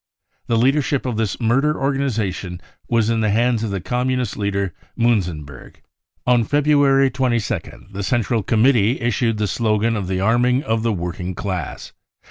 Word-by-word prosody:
The 115 - +1
leadership 135 +3 +1
of 120 -4 -2
this 110 -2 -1
murder 135 +6 +1
organisation 115 -10 -2 0.3
was 115 -1 +2
in 115 - +1
the 110 -1 +1
hands 115 +2 +2
of 110 - -2
the 100 -1 -2
Com 125 +8 -2
munist 125 -4 -1
leader 100 -3 -2 0.2
Muenzenberg. 90 - -2 0.2
" - - -48
On 125 -1 +4
February 140 0 +3
22nd 120 -7 -2
the 100 - -4
central 115 +2 0
committers 115 +1 +3
issued 115 -1 0
the 105 - 0
slogan 110 +2 0
of 100 -4 -3
the 95 0 -1
arming 120 +6 +2
of 110 0 0
the 115 0 0
working 90 -1 -4
class. 90 -6 -5
115 Hz, 160 wpm, -20 LUFS, 100-125 Hz, 0.3 s, On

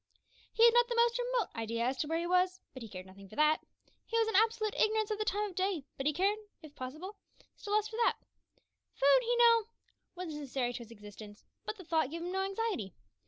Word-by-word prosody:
He 460 - +5
had 470 - +7
not 485 0 +5
the 475 - -1
most 470 +1 +3
remote - - 0
idea 230 0 -2
as 260 +2 0
to 300 - -2
where 325 +1 0
he 340 - -2
was, 365 +1 +2
but 260 - -9
he 225 - -8
cared 185 -1 -8
nothing 195 +1 -14
for 215 - -12
that. 305 +1 +3 0.5
He 460 - -1
was 450 -1 +3
in 445 - -1
absolute 440 0 +3
ignorance 435 0 +1
of 425 - -2
the 430 - 0
time 420 0 0
of - - -17
day, 370 -6 -1
but 270 - -2
he - - +4
cared, 390 +7 +1 0.2
if 305 -2 -12
possible, 310 +12 -7 0.4
still 415 -2 -5
less 425 0 +2
for 445 - -8
that. 470 - +2 0.8
Food, 280 - +5
he 485 0 0
knew, 465 -2 +5 0.5
was 355 -3 -5
necessary 270 -4 -2
to - - -5
his 235 -2 -10
existence, 210 -1 -12 0.2
but 430 - -3
the 375 - -10
thought 320 -4 +1
gave 335 +2 -5
him 355 - -4
no 380 +1 0
anxiety. 390 - -3
365 Hz, 235 wpm, -32 LUFS, 270-440 Hz, 0.8 s, had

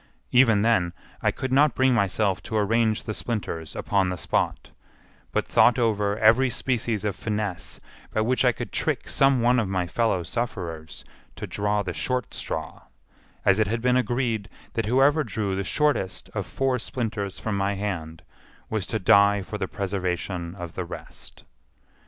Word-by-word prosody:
Even 115 -5 +5
then 95 -7 +2 0.3
I - - +3
could 130 - -3
not 140 +2 +4
bring 130 0 +3
myself 100 -2 +1
to 110 - -3
arrange 110 +1 +2
the 110 - -4
splinters 100 -9 -4
upon 95 -2 +1
the 90 - -3
spot, - - -1 0.6
but - - 0
thought 120 - +4
over 105 -4 +1
every 115 +5 +5
species 120 -4 -1
of 105 - -1
finesse 100 - -4 0.3
by 110 - 0
which 125 +4 +2
I 125 - +5
could 110 - -7
trick - - -1
some 135 -2 +3
one 125 +1 +4
of 110 -5 -1
my 95 -2 0
fellow 105 -1 0
sufferers 85 -8 -5 0.3
to - - -5
draw 105 0 -1
the 90 -2 -4
short 125 +5 -2
straw, - - -5 0.6
as 95 +2 +4
it 110 - +3
had 115 +2 -2
been 125 0 +3
agreed 120 -4 0 0.2
that 115 -2 -1
whoever 140 +6 +4
drew 105 -7 -2
the 100 - -1
shortest 140 -4 0
of - - -3
four 135 -2 0
splinters 110 -5 -3
from 110 -2 -3
my 100 +1 0
hand 80 -5 -4 0.5
was 110 -4 -1
to 110 - -1
die 100 0 +5
for 105 +2 -6
the 95 - -1
preservation 90 -3 -3
of 85 -3 -7
the 90 - -3
rest. 85 - -10
105 Hz, 170 wpm, -25 LUFS, 95-120 Hz, 0.6 s, Even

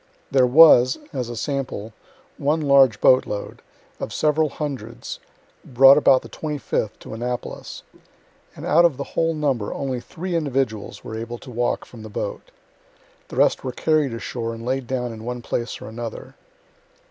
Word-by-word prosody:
There 130 -2 +4
was, 130 -2 +7 0.2
(as 125 -4 -3
a 120 - -5
sample,) 125 -6 -4 0.5
one 150 +3 +1
large 140 -6 +4
boat 130 0 +5
load, 105 - -6 0.4
of - - -5
several 155 0 +1
hundreds, 130 -7 -6 0.4
brought 135 +2 +7
about 135 -3 +4
the - - -11
25th, 145 -8 -3
to - - -9
Annapolis; 120 +2 -5 0.7
and - - -8
out 170 +3 +5
of 165 -7 +3
the 140 - -3
whole 165 +2 -1
number 135 -8 -1
only 130 -2 -3
three 175 +8 -5
individuals 130 -10 -2
were 110 - -7
able 115 +1 -6
to 125 - -12
walk 120 +1 -1
from 115 - -13
the 110 - -9
boat. 105 - -5 0.8
The - - -9
rest - - +3
were 130 - -3
carried 155 0 +1
ashore 115 0 -4
and 115 0 -9
laid 130 0 -2
down 125 -2 -2
in 110 0 -10
one 120 0 -5
place 120 +1 -3
or - - -9
another. 115 0 -7
130 Hz, 165 wpm, -22 LUFS, 115-145 Hz, 0.8 s, was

